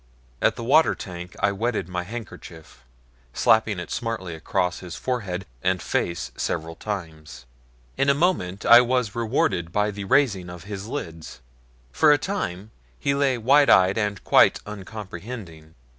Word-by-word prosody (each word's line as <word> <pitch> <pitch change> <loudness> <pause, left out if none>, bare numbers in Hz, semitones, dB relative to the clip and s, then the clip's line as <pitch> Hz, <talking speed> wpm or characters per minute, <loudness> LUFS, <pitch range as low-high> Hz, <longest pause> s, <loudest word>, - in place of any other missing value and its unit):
At - - +3
the - - -6
water 145 +7 +4
tank 90 -2 -8
I 100 - +3
wetted 110 -1 -2
my 90 -1 -3
handkerchief, 90 - -10 0.5
slapping 110 -2 +3
it 90 - -7
smartly 115 -7 -3
across 90 +2 -1
his 90 -2 -8
forehead 100 -5 -3 0.2
and 95 0 +1
face 85 -1 -2
several 80 +1 -3
times. 80 - -7 0.5
In 135 - +2
a 140 - +4
moment 140 - 0
I 120 +1 +9
was 125 -3 0
rewarded 110 -7 0
by 105 +2 +1
the 100 -1 -6
raising 95 -6 +2
of 90 -1 -9
his 100 0 -7
lids. 80 - -7 0.5
For 150 - +4
a 145 - +6
time 110 - -4 0.3
he 140 - 0
lay 140 -2 +1
wide 140 +5 +4
eyed 95 +3 +5
and 105 -3 -2
quite - - +5
uncomprehending. 95 -4 -9
100 Hz, 150 wpm, -24 LUFS, 90-120 Hz, 0.5 s, I